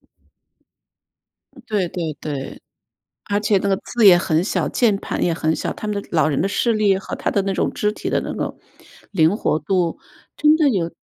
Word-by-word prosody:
嗯 -, -, -40 dB, 1.5 s
对 205 Hz, -5 st, 0 dB
对 165 Hz, -4 st, -4 dB
对。 140 Hz, -3 st, -6 dB, 0.7 s
而 205 Hz, 0 st, +1 dB
且 210 Hz, -1 st, +2 dB
那 200 Hz, -, -2 dB
个 195 Hz, -, +2 dB
字 235 Hz, 0 st, +1 dB
也 185 Hz, -3 st, +9 dB
很 165 Hz, -2 st, +1 dB
小， 180 Hz, -6 st, -1 dB
键 225 Hz, -5 st, +2 dB
盘 -, -, -4 dB
也 170 Hz, -, +2 dB
很 160 Hz, 0 st, 0 dB
小， -, -, -3 dB
他 215 Hz, -, -6 dB
们 205 Hz, -1 st, -1 dB
的 -, -, -16 dB
老 155 Hz, -2 st, +3 dB
人 145 Hz, -, 0 dB
的 185 Hz, -, +1 dB
视 205 Hz, +4 st, +1 dB
力 210 Hz, -3 st, +2 dB
和 190 Hz, -, -6 dB
他 -, -, -3 dB
的 200 Hz, -, +1 dB
那 195 Hz, 0 st, -1 dB
种 190 Hz, -, -1 dB
肢 210 Hz, -, 0 dB
体 -, -, -5 dB
的 -, -, +1 dB
那 -, -, -5 dB
个 -, -, -4 dB, 0.5 s
灵 170 Hz, 0 st, +3 dB
活 155 Hz, -, 0 dB
度 175 Hz, +1 st, -1 dB, 0.4 s
真 305 Hz, 0 st, +5 dB
的 310 Hz, -2 st, +3 dB
有 180 Hz, -8 st, 0 dB
195 Hz, 225 characters per minute, -21 LUFS, 165-210 Hz, 1.5 s, 也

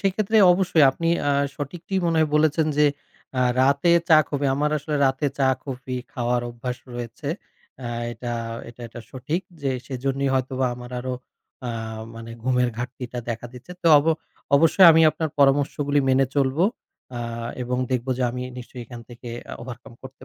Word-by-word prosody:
সেক্ষেত্রে 200 Hz, +2 st, +1 dB, 0.2 s
অবশ্যই 175 Hz, -4 st, +3 dB
আপনি 165 Hz, +4 st, -2 dB, 0.2 s
আ -, -, +3 dB, 0.3 s
সঠিকটিই 175 Hz, +6 st, -3 dB
মনে 165 Hz, -1 st, +1 dB
হয় 155 Hz, -1 st, +3 dB
বলেছেন 155 Hz, +1 st, +3 dB
যে 150 Hz, -, +6 dB, 0.5 s
আ -, -, +2 dB, 0.2 s
রাতে 140 Hz, +5 st, +3 dB, 0.2 s
চা, 160 Hz, -, +8 dB
coffee 140 Hz, -1 st, 0 dB
আমার 150 Hz, +1 st, +1 dB
আসলে 150 Hz, +1 st, -3 dB
রাতে 135 Hz, +2 st, 0 dB
চা, 135 Hz, -, +3 dB, 0.2 s
coffee 130 Hz, -2 st, -5 dB
খাওয়ার 120 Hz, 0 st, 0 dB
অভ্যাস 120 Hz, +1 st, -5 dB, 0.2 s
রয়েছে। 120 Hz, +4 st, -6 dB, 0.6 s
আ -, -, -3 dB, 0.2 s
এটা 120 Hz, 0 st, -5 dB, 0.4 s
এটা 120 Hz, +1 st, -13 dB
এটা 120 Hz, -, -9 dB
সঠিক 135 Hz, +7 st, -3 dB, 0.2 s
যে 135 Hz, -, +1 dB, 0.2 s
সেজন্যই 135 Hz, +1 st, -1 dB
হয়তোবা 130 Hz, 0 st, 0 dB
আমার 125 Hz, 0 st, -10 dB
আরও 130 Hz, +1 st, -3 dB, 0.5 s
আ -, -, -2 dB, 0.5 s
মানে 115 Hz, 0 st, -9 dB
ঘুমের 125 Hz, 0 st, +2 dB
ঘাটতিটা 125 Hz, 0 st, -5 dB
দেখা 115 Hz, +1 st, -4 dB
দিচ্ছে। 125 Hz, +8 st, -11 dB
তো -, -, 0 dB
ওব 145 Hz, -, -1 dB, 0.5 s
অবশ্যই 165 Hz, +5 st, +6 dB
আমি 160 Hz, +1 st, +5 dB
আপনার 155 Hz, +1 st, -3 dB
পরামর্শগুলি 145 Hz, +1 st, +3 dB
মেনে 130 Hz, +1 st, +4 dB
চলবো 140 Hz, +4 st, +2 dB, 0.5 s
আ -, -, -3 dB, 0.4 s
এবং 125 Hz, +1 st, -2 dB
দেখবো 130 Hz, 0 st, -1 dB
যে -, -, 0 dB
আমি 125 Hz, +1 st, -5 dB, 0.2 s
নিশ্চয়ই 125 Hz, 0 st, -9 dB
এখান 120 Hz, -1 st, -9 dB
থেকে 120 Hz, 0 st, -10 dB, 0.2 s
আ -, -, -8 dB
overcome 120 Hz, -1 st, -10 dB
করতে 130 Hz, 0 st, -12 dB
135 Hz, 165 wpm, -24 LUFS, 125-150 Hz, 0.6 s, চা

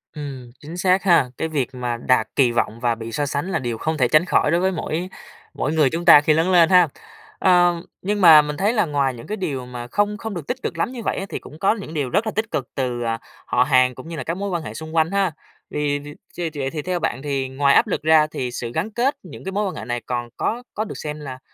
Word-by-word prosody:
Ừm, 135 Hz, -5 st, -7 dB
chính 160 Hz, +4 st, -9 dB
xác 185 Hz, +1 st, +2 dB
ha! 170 Hz, -9 st, +4 dB
Cái 160 Hz, -, -1 dB
việc 135 Hz, -5 st, -2 dB
mà 120 Hz, -1 st, -2 dB
đạt 120 Hz, -1 st, +2 dB
kỳ 130 Hz, -4 st, +4 dB
vọng 115 Hz, -1 st, -1 dB
và 120 Hz, -1 st, +1 dB
bị 115 Hz, 0 st, -7 dB
so 145 Hz, +4 st, -1 dB
sánh 145 Hz, +5 st, -3 dB
là -, -, 0 dB
điều 120 Hz, -3 st, -3 dB
không 160 Hz, +6 st, -2 dB
thể 125 Hz, -4 st, +3 dB
tránh 155 Hz, +6 st, +4 dB
khỏi 150 Hz, -, +2 dB
đối 170 Hz, -, +3 dB
với 190 Hz, +1 st, +2 dB
mỗi 175 Hz, 0 st, -3 dB, 0.4 s
mỗi 150 Hz, -, -2 dB
người 155 Hz, -4 st, +4 dB
chúng 170 Hz, +5 st, -4 dB
ta 155 Hz, -4 st, +9 dB
khi 155 Hz, +1 st, +3 dB
lớn 165 Hz, +4 st, +2 dB
lên 170 Hz, -3 st, +6 dB
ha. 180 Hz, -2 st, +6 dB, 0.5 s
Ờ, 175 Hz, -1 st, +4 dB, 0.3 s
nhưng 205 Hz, +2 st, -1 dB
mà 160 Hz, -4 st, +9 dB
mình 150 Hz, 0 st, -5 dB
thấy 205 Hz, +4 st, +1 dB
là 215 Hz, -5 st, +2 dB
ngoài 140 Hz, -4 st, 0 dB
những 115 Hz, -1 st, -11 dB
cái 215 Hz, -, -3 dB
điều 145 Hz, -10 st, -3 dB
mà 120 Hz, -1 st, -7 dB
không 205 Hz, +8 st, 0 dB
không 220 Hz, +1 st, -5 dB
được 170 Hz, -6 st, -6 dB
tích 250 Hz, -, -2 dB
cực -, -, -3 dB
lắm -, -, -1 dB
như 250 Hz, -2 st, -7 dB
vậy -, -, -1 dB
á, 195 Hz, -, -3 dB
thì -, -, -4 dB
cũng 155 Hz, -, -13 dB
có 195 Hz, +4 st, +3 dB
những 195 Hz, -7 st, -8 dB
điều 145 Hz, -5 st, -1 dB
rất 205 Hz, -, +1 dB
là -, -, 0 dB
tích 220 Hz, +1 st, -2 dB
cực 130 Hz, -, -2 dB
từ, 125 Hz, -3 st, -2 dB
à, 115 Hz, -1 st, -1 dB, 0.3 s
họ -, -, +2 dB
hàng 130 Hz, -1 st, +3 dB
cũng 130 Hz, -, -10 dB
như 165 Hz, -, -6 dB
là 155 Hz, -, -4 dB
các 165 Hz, +2 st, -3 dB
mối 200 Hz, +1 st, -3 dB
quan 175 Hz, -3 st, -2 dB
hệ -, -, -7 dB
xung 160 Hz, +1 st, -8 dB
quanh 160 Hz, +1 st, +2 dB
ha! 195 Hz, -3 st, +1 dB, 0.4 s
Thì 145 Hz, -1 st, 0 dB
từ 145 Hz, +1 st, -10 dB, 0.2 s
chê 175 Hz, -2 st, -3 dB
vậy 135 Hz, -1 st, -1 dB
thì 155 Hz, -, -4 dB
theo 180 Hz, +2 st, -2 dB
bạn 145 Hz, -6 st, -2 dB
thì 135 Hz, -2 st, -2 dB
ngoài 140 Hz, +1 st, +3 dB
áp -, -, +5 dB
lực -, -, -2 dB
ra 155 Hz, 0 st, +5 dB
thì 125 Hz, -4 st, -4 dB
sự 120 Hz, -1 st, -5 dB
gắn 175 Hz, -, -2 dB
kết 245 Hz, +6 st, +1 dB
những 175 Hz, -6 st, -11 dB
cái 190 Hz, -, -4 dB
mối 205 Hz, +2 st, -1 dB
quan 185 Hz, -, -5 dB
hệ -, -, -7 dB
này 120 Hz, -1 st, -3 dB
còn 120 Hz, -1 st, -3 dB
có 240 Hz, +3 st, -2 dB
có 215 Hz, -, -2 dB
được -, -, -7 dB
xem 150 Hz, 0 st, -5 dB
là 130 Hz, -3 st, -7 dB
155 Hz, 285 wpm, -22 LUFS, 130-180 Hz, 0.5 s, ta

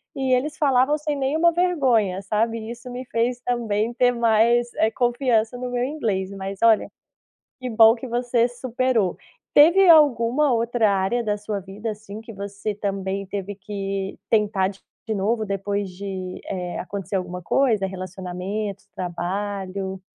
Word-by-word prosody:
e 265 Hz, -1 st, +1 dB
eles 290 Hz, +5 st, 0 dB
falavam 275 Hz, 0 st, +3 dB
sem 300 Hz, -1 st, -2 dB
nenhuma 300 Hz, +5 st, +2 dB
vergonha, 260 Hz, -, +1 dB
sabe? 225 Hz, +3 st, -1 dB
Isso 240 Hz, +1 st, -9 dB
me 250 Hz, +1 st, -6 dB
fez 240 Hz, +2 st, 0 dB
também 230 Hz, -2 st, -1 dB
ter 245 Hz, 0 st, +3 dB
mais, 235 Hz, 0 st, +3 dB
eh, 220 Hz, -, +3 dB
confiança 240 Hz, -2 st, +1 dB
no 250 Hz, 0 st, -4 dB
meu 245 Hz, 0 st, -1 dB
inglês. 215 Hz, -9 st, -2 dB
Mas 195 Hz, 0 st, -6 dB
olha, 225 Hz, -2 st, +4 dB, 0.7 s
que 255 Hz, -, -4 dB
bom 225 Hz, -1 st, +7 dB
que 245 Hz, +2 st, -7 dB
você 240 Hz, 0 st, +1 dB
superou. 245 Hz, -4 st, 0 dB, 0.4 s
Teve 345 Hz, +5 st, +7 dB
alguma 280 Hz, -3 st, +5 dB
outra 230 Hz, -1 st, +2 dB
área 195 Hz, +5 st, 0 dB
da 210 Hz, -1 st, 0 dB
sua 210 Hz, -1 st, -4 dB
vida 200 Hz, +4 st, -6 dB
assim 210 Hz, 0 st, -9 dB
que 225 Hz, 0 st, -10 dB
você 200 Hz, +1 st, -5 dB
também 195 Hz, -1 st, -3 dB
teve 200 Hz, +1 st, -5 dB
que 195 Hz, 0 st, -4 dB
tentar 205 Hz, -3 st, +2 dB
d 195 Hz, 0 st, -11 dB, 0.3 s
de 220 Hz, -, -1 dB
novo 215 Hz, +3 st, 0 dB
depois 200 Hz, 0 st, -2 dB
de, 185 Hz, 0 st, -6 dB
eh, 180 Hz, -2 st, -4 dB
acontecer 195 Hz, +1 st, -5 dB
alguma 180 Hz, -1 st, -3 dB
coisa, 220 Hz, 0 st, +2 dB
relacionamento, 190 Hz, +2 st, -5 dB
trabalho? 190 Hz, +1 st, -4 dB
220 Hz, 150 wpm, -23 LUFS, 195-245 Hz, 0.7 s, bom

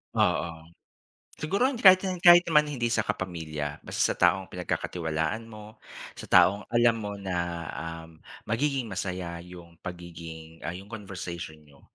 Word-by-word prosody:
Oo. 80 Hz, -1 st, 0 dB, 0.7 s
Siguro 200 Hz, -, +1 dB
hindi 245 Hz, -, -6 dB
kahit 185 Hz, 0 st, +9 dB, 0.2 s
kahit 175 Hz, 0 st, +9 dB
naman 150 Hz, -2 st, +4 dB
hindi 120 Hz, -5 st, -2 dB
sa 110 Hz, -3 st, +1 dB
kapamilya. 80 Hz, -7 st, -4 dB
Basta -, -, 0 dB
sa -, -, -21 dB
taong 95 Hz, +2 st, +3 dB
pinagkakatiwalaan 90 Hz, +3 st, -2 dB
mo, 110 Hz, -1 st, -12 dB, 0.4 s
sa -, -, -7 dB
taong 100 Hz, +3 st, +5 dB
alam 120 Hz, -1 st, +4 dB
mo 105 Hz, -1 st, -4 dB
na, 95 Hz, -2 st, -3 dB, 0.7 s
um, 80 Hz, -1 st, -16 dB, 0.3 s
magiging 130 Hz, +2 st, 0 dB
masaya 90 Hz, -3 st, -4 dB
yung 85 Hz, -2 st, -13 dB
pagiging 85 Hz, -2 st, -9 dB
ah, 85 Hz, -, -3 dB
yung 100 Hz, +3 st, -10 dB
conversation 90 Hz, -7 st, -7 dB
niyo, 70 Hz, -2 st, -21 dB
95 Hz, 140 wpm, -27 LUFS, 85-115 Hz, 0.7 s, kahit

